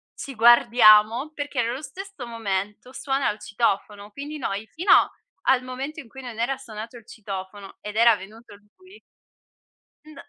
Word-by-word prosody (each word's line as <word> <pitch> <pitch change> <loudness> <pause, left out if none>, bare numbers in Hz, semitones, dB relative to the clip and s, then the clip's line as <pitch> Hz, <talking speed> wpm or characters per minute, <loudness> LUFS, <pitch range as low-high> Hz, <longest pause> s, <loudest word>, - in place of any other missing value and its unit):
ci 270 -3 -8
guardiamo, 235 +2 +6
perché 290 -4 -3
nello 240 +5 -3
stesso 385 -5 -9
momento 210 +1 -4
suona 270 0 -1
il 210 - -10
citofono, 205 -1 -2
quindi 290 +5 -7
noi 210 -5 -4
fino 355 +5 -1 0.5
al 260 -1 +4
momento 270 +5 -6
in 245 - -10
cui 265 +3 -11
non 240 -3 -8
era 255 +3 0
suonato 230 -2 -9
il 225 - -16
citofono 195 -1 -8
ed 210 0 -7
era 230 -1 +6
venuto 210 +2 -13 0.2
lui 375 +3 -18 1.1
N 310 -1 -14
235 Hz, 150 wpm, -24 LUFS, 210-270 Hz, 1.1 s, guardiamo